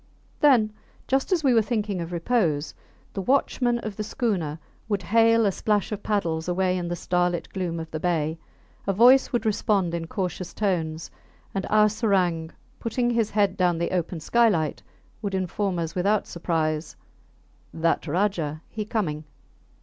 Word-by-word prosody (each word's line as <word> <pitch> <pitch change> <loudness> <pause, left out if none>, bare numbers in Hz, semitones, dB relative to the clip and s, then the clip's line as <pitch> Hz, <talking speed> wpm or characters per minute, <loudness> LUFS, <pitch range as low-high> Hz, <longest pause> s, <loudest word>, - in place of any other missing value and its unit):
Then, 235 -8 +4 0.3
just 270 +7 0
as 345 -4 +2
we 265 -3 +4
were 225 - +5
thinking 210 -4 -2
of 170 +1 -5
repose, 170 -5 0 0.4
the 195 - -3
watchmen 250 +1 +1
of 215 -3 -5
the 215 - -2
schooner 195 - -1 0.3
would 200 -3 0
hail 230 +3 +4
a 200 - +3
splash 205 +1 0
of 210 -1 -4
paddles 170 -7 -1
away 185 +1 +1
in 175 -1 -2
the 175 - -2
starlit 180 0 0
gloom 175 -3 -2
of 160 0 -7
the 155 - -3
bay; 160 -2 0 0.5
a 195 - +2
voice 250 +6 +6
would 240 -2 -1
respond 200 -4 +1
in 165 -1 -3
cautious 180 -1 -4
tones, 165 -6 -1 0.4
and 195 -1 -2
our 215 0 +5
serang, 190 -7 +1 0.3
putting 240 +1 0
his 230 -3 +1
head 200 -2 +1
down 180 -2 +2
the 170 - -1
open 175 -1 -2
skylight, 170 -4 +2 0.4
would 200 -3 -2
inform 190 0 -1
us 165 -1 -3
without 200 +3 +1
surprise, 160 -2 -2 0.8
That 165 +1 0
Rajah, 165 -3 -1
he 215 -1 -4
coming. 175 -9 -2
190 Hz, 160 wpm, -25 LUFS, 170-215 Hz, 0.8 s, voice